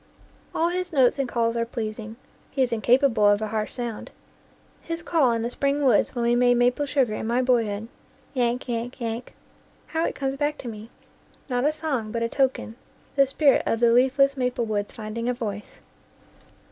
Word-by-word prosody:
All 335 Hz, +1 st, +2 dB
his 365 Hz, 0 st, -3 dB
notes 270 Hz, -3 st, +3 dB
and 265 Hz, -3 st, -1 dB
calls 230 Hz, -1 st, 0 dB
are 230 Hz, -, +1 dB
pleasing; 220 Hz, -1 st, -5 dB, 0.3 s
he 270 Hz, -, +1 dB
is 250 Hz, -, -1 dB
incapable 235 Hz, -1 st, +3 dB
of 205 Hz, 0 st, +3 dB
a 215 Hz, -1 st, -3 dB
harsh 215 Hz, 0 st, -3 dB
sound. 235 Hz, -3 st, -5 dB, 0.7 s
His 335 Hz, 0 st, -5 dB
call 315 Hz, -7 st, +3 dB
in 230 Hz, -1 st, -1 dB
the 235 Hz, -, -2 dB
spring 280 Hz, +2 st, 0 dB
woods 260 Hz, 0 st, +3 dB
when 240 Hz, -, -1 dB
we 235 Hz, 0 st, +3 dB
made 245 Hz, 0 st, +4 dB
maple 245 Hz, +4 st, +2 dB
sugar 265 Hz, -6 st, +1 dB
in 220 Hz, -, -4 dB
my 245 Hz, +2 st, +1 dB
boy 245 Hz, -3 st, +3 dB
hood 205 Hz, +2 st, -4 dB, 0.5 s
"yank, 245 Hz, -1 st, 0 dB
yank, 240 Hz, +1 st, -4 dB
yank" 230 Hz, 0 st, -5 dB, 0.5 s
how 325 Hz, 0 st, -2 dB
it -, -, -2 dB
comes 270 Hz, -1 st, -2 dB
back 295 Hz, +1 st, -1 dB
to 250 Hz, -, -8 dB
me! 220 Hz, 0 st, -8 dB, 0.6 s
Not 245 Hz, +2 st, +1 dB
a 300 Hz, -, +4 dB
song, 295 Hz, -9 st, -3 dB
but 230 Hz, 0 st, -2 dB
a 230 Hz, -, -1 dB
token 260 Hz, -4 st, -1 dB, 0.4 s
the 275 Hz, -1 st, +5 dB
spirit 275 Hz, +1 st, +3 dB
of 225 Hz, -, +1 dB
the 235 Hz, -1 st, +4 dB
leafless 270 Hz, +3 st, +4 dB
maple 250 Hz, -2 st, -1 dB
woods 205 Hz, -2 st, -2 dB
finding 230 Hz, +2 st, -4 dB
a 250 Hz, -, 0 dB
voice. 210 Hz, -3 st, -6 dB
245 Hz, 195 wpm, -25 LUFS, 230-275 Hz, 0.7 s, the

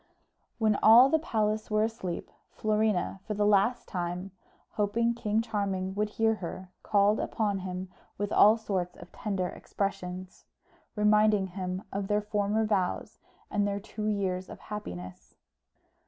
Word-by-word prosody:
When 215 Hz, -3 st, +2 dB
all 235 Hz, +4 st, +8 dB
the 320 Hz, -, +3 dB
palace 215 Hz, -7 st, -1 dB
were 215 Hz, 0 st, +2 dB
asleep, 220 Hz, -6 st, -4 dB, 0.2 s
Florina 215 Hz, -3 st, 0 dB
for 210 Hz, -, -2 dB
the 205 Hz, 0 st, +1 dB
last 210 Hz, +4 st, +3 dB
time, 180 Hz, +1 st, -4 dB, 0.4 s
hoping 230 Hz, +3 st, +1 dB
King 220 Hz, -1 st, 0 dB
Charming 195 Hz, -4 st, -2 dB
would 210 Hz, +1 st, -1 dB
hear 225 Hz, +1 st, +2 dB
her, 185 Hz, -2 st, -7 dB
called 205 Hz, 0 st, +3 dB
upon 205 Hz, -3 st, -1 dB
him 185 Hz, 0 st, -5 dB, 0.3 s
with 205 Hz, 0 st, -2 dB
all 215 Hz, +2 st, +7 dB
sorts 185 Hz, -5 st, -3 dB
of 175 Hz, -, -13 dB
tender 195 Hz, -4 st, -2 dB
expressions, 185 Hz, -2 st, -5 dB, 0.5 s
reminding 210 Hz, -1 st, +4 dB
him 185 Hz, +1 st, -4 dB
of 195 Hz, 0 st, -2 dB
their 210 Hz, +1 st, +1 dB
former 210 Hz, +1 st, 0 dB
vows, 195 Hz, -4 st, -1 dB, 0.3 s
and 205 Hz, 0 st, +1 dB
their 200 Hz, 0 st, -1 dB
two 210 Hz, +1 st, -5 dB
years 190 Hz, -3 st, -1 dB
of -, -, -8 dB
happiness. 90 Hz, -, -8 dB
205 Hz, 140 wpm, -29 LUFS, 185-215 Hz, 0.5 s, all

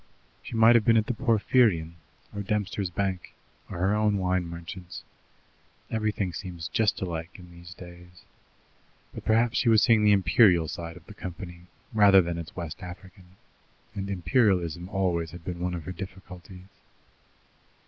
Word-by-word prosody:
She -, -, -8 dB
might 115 Hz, +1 st, +7 dB
have 120 Hz, -2 st, +4 dB
been 115 Hz, +1 st, +4 dB
at 110 Hz, -, +2 dB
the 125 Hz, -, -2 dB
Porphyrion, 110 Hz, -8 st, +2 dB, 0.4 s
or 100 Hz, -, -4 dB
Dempster's 100 Hz, -1 st, -2 dB
Bank, 95 Hz, 0 st, -3 dB, 0.3 s
or -, -, -6 dB
her 95 Hz, +4 st, +1 dB
own 105 Hz, -1 st, +2 dB
wine 90 Hz, -1 st, 0 dB
merchant's. 85 Hz, +2 st, -8 dB, 0.9 s
Everything 105 Hz, -4 st, -1 dB
seems 85 Hz, -2 st, -6 dB
just 110 Hz, -2 st, +1 dB
alike 85 Hz, -2 st, -4 dB
in 90 Hz, -2 st, -13 dB
these 85 Hz, 0 st, -12 dB
days. 90 Hz, 0 st, -14 dB, 0.9 s
But -, -, -9 dB
perhaps 115 Hz, +2 st, +2 dB
she 120 Hz, -, +2 dB
was 110 Hz, -2 st, +5 dB
seeing 110 Hz, -2 st, +4 dB
the 105 Hz, -, +5 dB
Imperial 90 Hz, -3 st, +4 dB
side 85 Hz, +2 st, -6 dB
of 90 Hz, -, -16 dB
the 105 Hz, -, -12 dB
company 90 Hz, -2 st, -9 dB, 0.3 s
rather 100 Hz, -3 st, +7 dB
than 85 Hz, 0 st, -3 dB
its 85 Hz, +1 st, -9 dB
West 85 Hz, -2 st, -6 dB
African, 90 Hz, 0 st, -12 dB, 0.6 s
and 100 Hz, -2 st, -5 dB
Imperialism 90 Hz, -, +1 dB
always 90 Hz, -5 st, -1 dB
had 85 Hz, +3 st, -12 dB
been 90 Hz, -2 st, -5 dB
one 90 Hz, 0 st, -2 dB
of 85 Hz, -, -6 dB
her 95 Hz, -, -6 dB
difficulties. 90 Hz, -1 st, -10 dB
95 Hz, 160 wpm, -27 LUFS, 85-105 Hz, 0.9 s, might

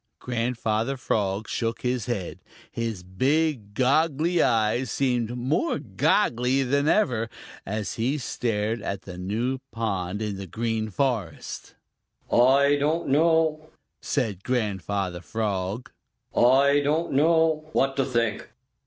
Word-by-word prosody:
Grandfather 120 Hz, 0 st, -1 dB
Frog 105 Hz, -3 st, -1 dB
shook 115 Hz, -1 st, -2 dB
his 125 Hz, -2 st, -1 dB
head. 100 Hz, -8 st, -3 dB, 0.3 s
His 115 Hz, -5 st, -3 dB
big 130 Hz, -, 0 dB
goggly 155 Hz, +6 st, +2 dB
eyes 115 Hz, +2 st, +2 dB
seemed 125 Hz, -3 st, 0 dB
more 135 Hz, -, 0 dB
goggly 130 Hz, -, +1 dB
than 140 Hz, +3 st, +1 dB
ever, 120 Hz, -, +2 dB, 0.4 s
as 105 Hz, -1 st, -3 dB
he 130 Hz, +6 st, +1 dB
stared 115 Hz, -4 st, -2 dB
at 100 Hz, -1 st, -4 dB
the 90 Hz, -2 st, -9 dB
new 115 Hz, +8 st, -2 dB
pond 100 Hz, -4 st, -2 dB
in 105 Hz, -2 st, -3 dB
the 95 Hz, 0 st, -7 dB
Green 110 Hz, +3 st, -2 dB
Forest. 105 Hz, -, -3 dB, 0.6 s
"I 140 Hz, +4 st, +5 dB
don't 155 Hz, +3 st, 0 dB
know," 155 Hz, +1 st, +2 dB, 0.3 s
said 105 Hz, -9 st, -2 dB
Grandfather 100 Hz, -6 st, -2 dB
Frog. 105 Hz, 0 st, -3 dB, 0.4 s
"I 140 Hz, +4 st, +5 dB
don't 155 Hz, +4 st, 0 dB
know 160 Hz, +1 st, +3 dB
what 135 Hz, 0 st, +2 dB
to 135 Hz, -, +3 dB
think." 115 Hz, -4 st, -1 dB
120 Hz, 120 wpm, -25 LUFS, 105-140 Hz, 0.6 s, I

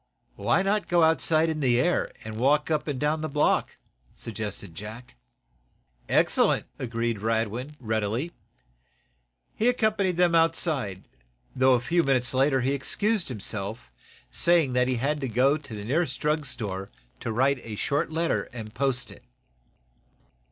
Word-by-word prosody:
"Why 195 Hz, -, +2 dB
not 205 Hz, +1 st, 0 dB
go 175 Hz, -3 st, +3 dB
outside 160 Hz, +1 st, +3 dB
in 160 Hz, -1 st, -2 dB
the 125 Hz, -4 st, +3 dB
air, 175 Hz, +6 st, +1 dB
and 110 Hz, 0 st, -6 dB
walk 145 Hz, +5 st, +2 dB
up 155 Hz, 0 st, 0 dB
and 140 Hz, -4 st, -2 dB
down 150 Hz, +1 st, 0 dB
the 155 Hz, -, -3 dB
block?" 150 Hz, +1 st, +1 dB, 0.4 s
suggested 105 Hz, -5 st, -6 dB
Jack. 110 Hz, -, -9 dB, 0.9 s
"Excellent!" -, -, +3 dB
agreed 115 Hz, -3 st, -2 dB
Radwin, 115 Hz, +5 st, -1 dB
readily. 110 Hz, +6 st, -1 dB, 1.2 s
He 225 Hz, -, 0 dB
accompanied 215 Hz, -7 st, +1 dB
them 175 Hz, -1 st, +4 dB
outside, 160 Hz, -, +1 dB, 0.5 s
though, 130 Hz, 0 st, +5 dB
a 125 Hz, -, +4 dB
few 170 Hz, +8 st, +1 dB
moments 130 Hz, -4 st, +1 dB
later, 135 Hz, 0 st, +3 dB
he 130 Hz, +2 st, +1 dB
excused 200 Hz, +8 st, -1 dB
himself, 105 Hz, -, -5 dB, 0.4 s
saying 170 Hz, -7 st, +2 dB
that 125 Hz, 0 st, +2 dB
he 130 Hz, -, +1 dB
had 140 Hz, +5 st, 0 dB
to 135 Hz, -, -2 dB
go 130 Hz, +5 st, +3 dB
to 140 Hz, -7 st, -8 dB
the 105 Hz, -, -6 dB
nearest 135 Hz, +1 st, 0 dB
drugstore 115 Hz, -11 st, -2 dB, 0.3 s
to 115 Hz, -, -4 dB
write 130 Hz, +3 st, +1 dB
a 110 Hz, -2 st, -6 dB
short 145 Hz, +9 st, -1 dB
letter 165 Hz, +1 st, 0 dB
and 110 Hz, -3 st, -8 dB
post 135 Hz, -1 st, -1 dB
it. -, -, -15 dB
135 Hz, 145 wpm, -26 LUFS, 115-160 Hz, 1.2 s, though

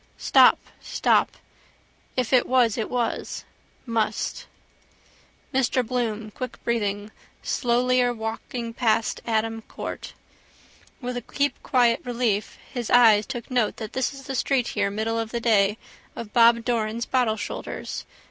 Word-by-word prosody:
Stop. -, -, +6 dB, 0.2 s
Stop. -, -, +2 dB, 0.8 s
If 255 Hz, 0 st, 0 dB
it 250 Hz, -, +4 dB
was 245 Hz, -4 st, +3 dB
it 220 Hz, -, -3 dB
was. 240 Hz, -2 st, -2 dB, 0.4 s
Must. 225 Hz, -3 st, -2 dB, 1.1 s
Mr 255 Hz, -1 st, +2 dB
Bloom, 225 Hz, -3 st, -2 dB
quickbreathing, 215 Hz, -4 st, -3 dB, 0.3 s
slowlier 245 Hz, 0 st, +2 dB
walking 230 Hz, +1 st, -5 dB
passed 230 Hz, -2 st, +1 dB
Adam 225 Hz, 0 st, 0 dB
court. -, -, -7 dB, 0.9 s
With 250 Hz, 0 st, -3 dB
a -, -, -3 dB
keep 285 Hz, +4 st, -1 dB
quiet 240 Hz, -3 st, +3 dB
relief 235 Hz, -4 st, -1 dB, 0.2 s
his 240 Hz, -3 st, -3 dB
eyes 220 Hz, -4 st, +6 dB
took 240 Hz, +1 st, -6 dB
note 245 Hz, -4 st, +1 dB
this 240 Hz, +3 st, -2 dB
is 275 Hz, -1 st, -11 dB
the 270 Hz, -, -5 dB
street 255 Hz, -1 st, +1 dB
here 205 Hz, -2 st, 0 dB
middle 220 Hz, +3 st, -1 dB
of 225 Hz, -1 st, -3 dB
the 235 Hz, -, -2 dB
day 210 Hz, -3 st, +3 dB, 0.4 s
of 215 Hz, -3 st, -8 dB
Bob 235 Hz, 0 st, +5 dB
Doran's 230 Hz, -1 st, -1 dB
bottle 245 Hz, -4 st, +1 dB
shoulders. -, -, -5 dB
235 Hz, 130 wpm, -25 LUFS, 220-245 Hz, 1.1 s, Stop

